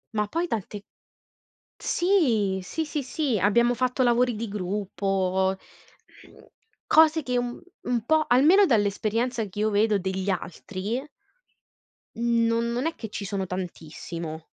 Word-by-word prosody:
ma 210 -1 +1
poi, 335 +10 -1
tante 205 - -4 1.0
Sì, 245 - +1
sì, 320 - -3
sì, 295 -1 -3
sì, 265 -4 -1
abbiamo 235 +6 +3
fatto 255 +1 0
lavori 245 0 +3
di 225 0 -4
gruppo, 190 -1 -1 0.7
mhmm - - -19 0.4
cose 315 -1 +5
che, 250 -1 -1
un 245 0 -2 0.2
un 235 -3 -1
po' 315 -1 +3
almeno 310 +11 +6
dall'esperienza, 225 - 0
che 200 - -11
io 215 0 +2
vedo, 210 0 +2
degli 190 +1 -2
altri 195 +7 -4 1.1
n 235 0 +1
non 235 +3 0
è 330 - 0
che 220 - -7
ci 210 -1 -5
sono 195 -1 -2
tantissimo. 165 -2 -6
225 Hz, 130 wpm, -26 LUFS, 195-250 Hz, 1.1 s, almeno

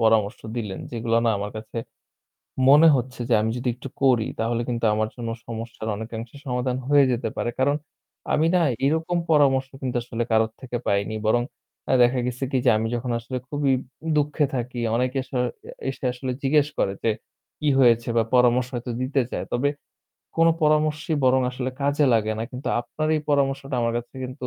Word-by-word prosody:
পরামর্শ 110 -2 +2 0.2
দিলেন 105 -5 -4
যেগুলো 115 -1 0
না 115 - +4
আমার 100 +1 -4
কাছে 110 +2 -8 0.9
মনে 150 +4 +8
হচ্ছে 125 0 -5
যে - - +4
আমি 110 +1 0
যদি 125 +1 -4
একটু 130 +1 -8
করি 125 -5 +4
তাহলে 115 +1 0
কিন্তু 120 -1 -1
আমার 110 0 +1
জন্য 120 -2 -5 0.2
সমস্যার 115 -1 -6
অনেকাংশে 110 +3 -7
সমাধান 125 -1 -1
হয়ে 145 0 +6
যেতে 120 -2 -1
পারে। - - -1
কারণ 140 +2 +3 0.6
আমি 155 - +3
না 180 - +4 0.2
এরকম 160 +4 +1
পরামর্শ 135 -3 +4
কিন্তু 125 -2 -1
আসলে 120 -1 -3
কারো 110 0 +4 0.2
থেকে 125 -2 -4
পাইনি। 100 +2 +1
বরং 115 +2 +3 0.4
অ্যা 135 - +2
দেখা 125 +1 +3
গেছে 125 +1 -3
কি 135 - +2
যে 125 - +6
আমি 110 +1 -1
যখন 120 +1 -3
আসলে 125 +2 -5
খুবই 145 -2 +1 0.4
দুঃখে 150 0 +2
থাকি 125 0 -3 0.2
অনেকে 130 +2 0
স - - -33
অ্যা 125 - +1 0.5
এসে - - -6
আসলে 130 +1 -4
জিজ্ঞেস 145 +1 +3
করে, 95 - +1
যে 115 - +3 0.5
কি 150 - -1
হয়েছে 120 -3 +4
বা 115 - +4
পরামর্শ 125 0 +4
হয়তো 120 0 -3
দিতে 135 +2 +1
চায়। - - -3
তবে 130 +4 +1 0.7
কোন 165 0 +5 0.2
পরামর্শই 155 0 +2
বরং 130 +1 +4
আসলে 125 0 -3
কাজে 145 +1 +2
লাগে 110 -1 +1
না। - - -1
কিন্তু 130 +1 -5
আপনার 155 +5 -3
এই - - -1
পরামর্শটা 140 -1 +1
আমার 115 0 +1
কাছে 120 +2 -10
কিন্তু 125 0 -7
125 Hz, 185 wpm, -24 LUFS, 115-140 Hz, 0.9 s, মনে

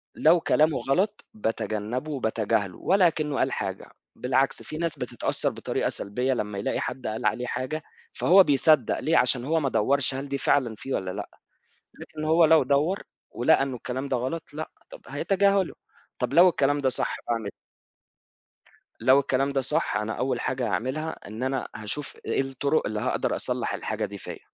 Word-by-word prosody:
لو 165 +3 +5
كلامه 155 -1 +3
غلط 200 +9 +1
باتجنبه 110 +5 -3
وباتجاهله 110 -7 -1
ولا 190 -1 +4
أكنه 150 -3 -2
قال - - +1
حاجة، - - -4 0.2
بالعكس 130 +2 +1
في 155 - -7
ناس 165 -1 -1
بتتأثّر - - -1
بطريقة - - -2
سلبية 125 +6 -1
لمّا 105 -4 -3
يلاقي 100 - -1
حد 130 - -4
قال 110 0 -4
عليه 125 +4 +1
حاجة، 140 +6 -3 0.3
فهو 190 +3 +6
بيصدّق، 150 0 +3
ليه، 165 +1 +2
عشان 125 0 +2
هو 160 +2 +2
ما 140 - 0
دوّرش 135 +5 +1
هل 135 +1 -5
دي 140 - -1
فعلًا 130 -5 +1
فيه 135 +5 -6
والّا 95 -1 -2
لأ، 100 +2 -6 0.7
لكن 155 -1 -7
هو 160 +1 +5
لو 160 -2 +6
دوّر 145 +8 +1 0.3
ولقى 135 +4 +3
إنه 135 -2 -3
الكلام 130 +3 -4
ده 135 -2 0
غلط 130 +8 -4
لأ 155 +1 -5 0.2
طب - - -11
هيتجاهله، 195 +5 +1 0.5
طب 135 - -1
لو 180 +3 +8
الكلام 145 -2 +1
ده 135 -2 +2
صح - - -1
باعمل 115 -3 -1 1.5
لو 130 +2 +6
الكلام 135 0 0
ده 135 - +1
صح 125 -4 0
أنا 105 +1 -2
أول 130 +2 -1
حاجة 125 0 -1
هاعملها، 155 +7 -3
إن 110 +4 -6
أنا 130 0 -1
هاشوف 110 +7 -3
إيه - - +1
الطرق 135 +3 0
اللي 105 0 -3
هاقدر - - 0
أصلح - - -2
الحاجة - - -2
دي - - -8
فيّا. - - -8
135 Hz, 175 wpm, -26 LUFS, 120-155 Hz, 1.5 s, لو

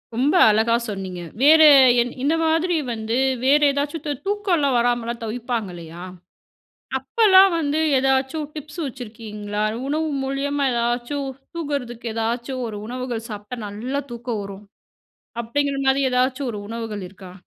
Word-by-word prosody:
ரொம்ப 275 +8 +2
அழகா 220 +2 +3
சொன்னீங்க. 190 -3 -5 0.2
வேற 310 +3 +7 0.4
என் 240 +1 -2
இந்த 290 +3 +2
மாதிரி 325 +2 +1 0.2
வந்து 225 0 -3 0.3
வேற 285 +3 +5
ஏதாச்சும் 285 +2 -3
து 295 - -1 0.2
தூக்கம்லாம் 360 -10 +1
வராமலாம் 235 0 0
தவிப்பாங்க 230 -2 -3
இல்லயா? 170 0 -9 0.9
அப்பலாம் 380 - +5
வந்து 300 0 0 0.2
ஏதாச்சும் 265 +3 0
டிப்ஸ் 305 +3 -8
வச்சிருக்கீங்களா? 215 -5 -5 0.2
உணவு 310 +2 -1
மூலியமா 280 +1 -1
எதாச்சும் 240 +4 -1 0.3
தூங்கறதுக்கு, 275 -7 -4
ஏதாச்சும் 235 +3 -2
ஒரு 210 -2 -6
உணவுகள் 245 -2 -4
சாப்ட்டா 210 +3 -7
நல்லா 245 +8 -3
தூக்கம் 235 -2 -4
வரும், 200 0 -9 0.8
அப்டீங்குற 280 +4 -1
மாரி 270 +1 +3
ஏதாச்சும் 255 +2 +1
ஒரு 210 - -5
உணவுகள் 225 -3 -5
இருக்கா? 185 -1 -13
250 Hz, 125 wpm, -22 LUFS, 225-285 Hz, 0.9 s, வேற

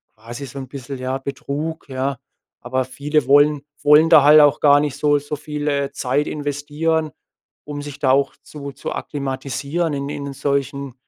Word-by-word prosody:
quasi 115 +5 -8
so 135 - -10
'n 130 - -7
bisschen, 135 +1 -7
ja, 130 +1 -2
Betrug, 145 +3 -5
ja. 135 0 -2 0.4
Aber 130 +1 -1
viele 140 +2 -1
wollen 145 +1 +4 0.2
wollen 150 +2 +6
da 155 -4 +8
halt 150 +2 +8
auch 145 -2 +4
gar 145 -1 +6
nicht 145 -2 -1
so 145 0 +3
so 145 +1 -5
viel, 150 0 -5
äh, 140 -1 0
Zeit 135 +3 0
investieren, 150 +2 -2 0.5
um 145 0 -6
sich 145 -1 -8
da 130 - +3
auch 135 +1 +2
zu 140 -2 -8
zu - - -6
akklimatisieren 140 +4 -3
in 140 0 -3
in 140 -1 -5
solchen 140 -1 -2
140 Hz, 175 wpm, -20 LUFS, 135-150 Hz, 0.5 s, da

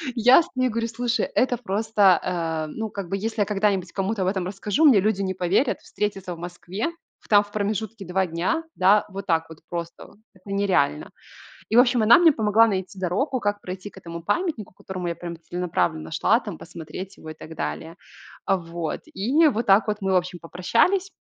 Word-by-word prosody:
я 250 +7 +6
стою 255 -6 -1
и - - -1
говорю: 230 0 -1
"Слушай, 235 0 -1
это 250 -1 +1
просто, 220 -1 -2 0.2
э, 165 -3 -2
ну, 220 +8 -5
как 200 -3 -6
бы, 195 - -1
если 220 +1 -2
я - - +3
когда-нибудь 195 -3 0
кому-то 195 +2 -2
об - - -1
этом 190 -1 -1
расскажу, 205 - 0
мне 245 -9 +7
люди 200 0 +1
не 190 -1 -1
поверят: 185 +8 +1
встретиться 195 -4 -4
в - - -14
Москве, 175 - -4 0.3
в - - -23
там 205 -1 +6
в 205 - -17
промежутке 210 0 -3
2 190 +2 0
дня. 175 - -1
Да, 195 +3 +4
вот 195 0 -7
так 165 -2 +2
вот 160 - -12
просто 170 -1 -6
вот- - - -20 0.2
это 190 +1 -17
нереально". 185 - +1 0.6
И, 220 - +1
в 245 - +10
общем, 245 -2 +3
она 225 +2 +8
мне 335 -2 +6
помогла 220 -2 +4
найти 190 -1 -3
дорогу, 240 - -1
как 205 -1 -1
пройти 185 +2 -7
к 190 - -14
этому 170 -2 -8
памятнику, 215 - -2
к - - -39
которому 185 -2 -5
я 170 - -2
прям 170 -1 -7
целенаправленно 90 - -2
шла, - - +3
там, - - -7
посмотреть 175 +4 -9
его 155 - -9
и - - -7
так 160 +1 -11
далее, 75 - -5 0.5
а, 195 - +3
вот. 170 -2 -5
И 275 +11 +3
вот 230 -3 -1
так 200 +3 +5
вот 210 0 -1
мы, 190 -1 0
в - - +4
общем, 180 0 -1
попрощались. 230 - +1
195 Hz, 210 wpm, -24 LUFS, 175-220 Hz, 0.6 s, в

